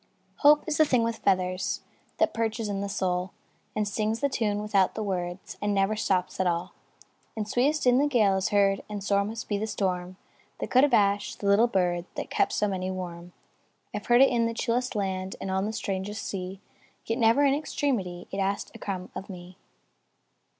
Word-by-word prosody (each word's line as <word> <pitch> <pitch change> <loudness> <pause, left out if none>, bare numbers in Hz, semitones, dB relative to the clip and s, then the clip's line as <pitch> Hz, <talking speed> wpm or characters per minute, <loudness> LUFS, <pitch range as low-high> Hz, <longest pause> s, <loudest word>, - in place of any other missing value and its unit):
Hope 295 0 +6
is 310 -2 -1
the 310 - +7
thing 250 -5 +2
with 230 0 -1
feathers 185 -1 0 0.4
That - - +2
perches 225 -1 -1
in 200 -1 -2
the 200 - -3
soul, 180 -2 -1 0.4
And 210 -1 0
sings 215 +2 -1
the 280 - +1
tune 210 -5 0
without 205 -3 +2
the 220 - -2
words, 180 -2 -4
And 205 0 0
never 195 +2 +2
stops 190 -4 -1
at 185 - +2
all, 175 +1 -1 0.6
And 210 -1 -2
sweetest 280 +7 +1
in 250 +1 +5
the 290 - +3
gale 215 -8 +3
is 190 0 0
heard; 200 -1 +3
And 205 -2 -5
sore 200 0 +2
must 220 +3 -5
be 205 -1 -1
the 220 - -2
storm 185 -3 -2 0.4
That - - -5
could 255 +1 +6
abash 205 -7 +2
the - - -8
little 200 +4 +5
bird 180 -5 0
That - - -5
kept - - +2
so 210 - +1
many 185 -2 -2
warm. 175 -2 -6 0.6
I - - -2
've - - -16
heard 240 +1 +6
it 270 - +6
in 235 -2 +2
the 230 - -4
chillest 245 +1 -1
land, 190 -2 -2
And 190 - -4
on 190 +1 0
the - - -2
strangest 200 0 -3
sea; 190 0 -5 0.4
Yet, 225 +3 -2
never, 230 +5 +4
in 275 - +4
extremity, 245 - -2
It 195 - -3
asked 195 +1 -1
a - - -11
crumb 185 -2 -5
of 195 - -7
me. 180 -1 -10
200 Hz, 205 wpm, -27 LUFS, 185-230 Hz, 0.6 s, the